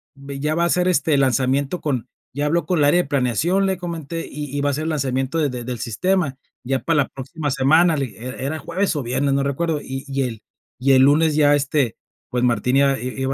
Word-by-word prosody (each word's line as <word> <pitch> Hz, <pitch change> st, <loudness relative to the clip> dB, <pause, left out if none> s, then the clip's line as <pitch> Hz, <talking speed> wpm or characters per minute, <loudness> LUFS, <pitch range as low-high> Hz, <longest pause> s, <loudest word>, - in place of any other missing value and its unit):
"Ve, 140 Hz, 0 st, -8 dB
ya 150 Hz, +2 st, 0 dB
va 170 Hz, -, +1 dB
a -, -, +3 dB
hacer 180 Hz, +1 st, +1 dB
este 165 Hz, -4 st, +2 dB
lanzamiento 135 Hz, +4 st, +1 dB
con 130 Hz, -6 st, -2 dB, 0.3 s
ya 145 Hz, +2 st, -1 dB
habló 170 Hz, +3 st, +1 dB
con 180 Hz, -3 st, 0 dB
el 145 Hz, -, +4 dB
área 175 Hz, +5 st, +4 dB
de -, -, -12 dB
planeación", 145 Hz, -, +1 dB
le 190 Hz, -1 st, 0 dB
comenté: 165 Hz, -2 st, -5 dB
"Y 145 Hz, -1 st, -5 dB
y -, -, 0 dB
va 145 Hz, -, +1 dB
a -, -, +1 dB
hacer 150 Hz, +3 st, -2 dB
el -, -, -1 dB
lanzamiento 135 Hz, 0 st, -1 dB
de 150 Hz, -2 st, +1 dB
de 125 Hz, -2 st, -5 dB
del 125 Hz, -1 st, -4 dB
sistema. 140 Hz, -, 0 dB, 0.3 s
Ya 135 Hz, +1 st, 0 dB
para 165 Hz, -2 st, +1 dB
la -, -, -11 dB
próxima 145 Hz, +3 st, -5 dB
semana", 155 Hz, +5 st, +4 dB
le 135 Hz, -2 st, -1 dB
dije, 115 Hz, +1 st, -12 dB
e 130 Hz, +1 st, -5 dB
era 150 Hz, +3 st, -2 dB
jueves 185 Hz, +2 st, -1 dB
o 145 Hz, -, -2 dB
viernes, 135 Hz, +3 st, 0 dB
no 140 Hz, 0 st, +1 dB
recuerdo, 150 Hz, +3 st, -1 dB
y 135 Hz, 0 st, -6 dB
y 135 Hz, 0 st, -1 dB
el 115 Hz, -4 st, -5 dB, 0.4 s
y 135 Hz, +2 st, +3 dB
el 130 Hz, -, +6 dB
lunes 150 Hz, +2 st, +4 dB
ya 145 Hz, -1 st, +5 dB
este, 140 Hz, -4 st, 0 dB, 0.3 s
pues, 125 Hz, 0 st, -1 dB
Martín 125 Hz, +2 st, +2 dB
iba 140 Hz, -2 st, +3 dB
i 125 Hz, +2 st, -4 dB
i 135 Hz, -, -7 dB
iba 130 Hz, -, 0 dB
140 Hz, 250 wpm, -21 LUFS, 130-160 Hz, 0.4 s, el